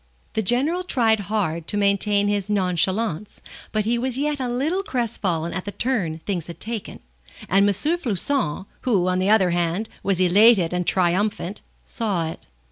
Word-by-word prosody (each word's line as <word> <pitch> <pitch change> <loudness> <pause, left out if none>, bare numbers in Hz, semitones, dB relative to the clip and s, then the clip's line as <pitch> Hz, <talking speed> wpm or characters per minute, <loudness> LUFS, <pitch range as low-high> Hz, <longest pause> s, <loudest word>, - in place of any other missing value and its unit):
The 220 - 0
General 270 - +2
tried 230 -11 +2
hard 170 -6 -1
to 205 - -1
maintain 200 0 +2
his 205 -1 -1
nonchalance, 190 0 -1 0.3
but 215 -1 0
he 235 +2 +1
was 255 0 -1
yet 295 +1 -1
a 255 -2 -2
little 295 +10 0
crestfallen 205 - -2
at 185 - -4
the 205 - -4
turn 200 -7 -1
things 180 -5 -2
had 170 - -9
taken, 225 -2 -5 0.5
and 200 +3 +4
M. - - +4
Floçon, 250 - -1 0.2
who, 200 -8 +1
on 185 0 +1
the 190 +2 +1
other 195 -5 +4
hand, 175 +5 -1
was 195 -2 0
elated 185 0 +5
and 180 -1 -1
triumphant, 190 +1 0 0.2
saw 195 -8 -2
it. - - -12
205 Hz, 165 wpm, -23 LUFS, 180-235 Hz, 0.5 s, elated